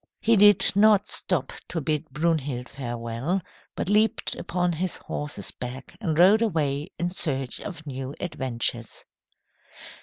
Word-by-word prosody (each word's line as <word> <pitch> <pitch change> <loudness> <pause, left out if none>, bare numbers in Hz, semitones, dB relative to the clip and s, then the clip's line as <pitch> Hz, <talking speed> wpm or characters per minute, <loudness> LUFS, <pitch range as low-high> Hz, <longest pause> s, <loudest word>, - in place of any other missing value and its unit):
He 230 0 +3
did 205 -1 +7
not 205 -1 +5
stop 170 -8 -2
to 170 - -3
bid 155 +1 -2
Brunhild 145 -4 -1
farewell, 120 +6 -3 0.4
but - - -3
leaped 210 +2 +2
upon 180 0 -1
his 180 +2 -2
horse's 145 -10 -4
back 125 +1 -8
and 160 -7 -1
rode 195 +6 +6
away 150 -7 0
in 175 0 -2
search 135 -8 -1
of 165 -6 -8
new 135 -1 -6
adventures. 120 -7 -3
155 Hz, 130 wpm, -25 LUFS, 130-185 Hz, 0.4 s, did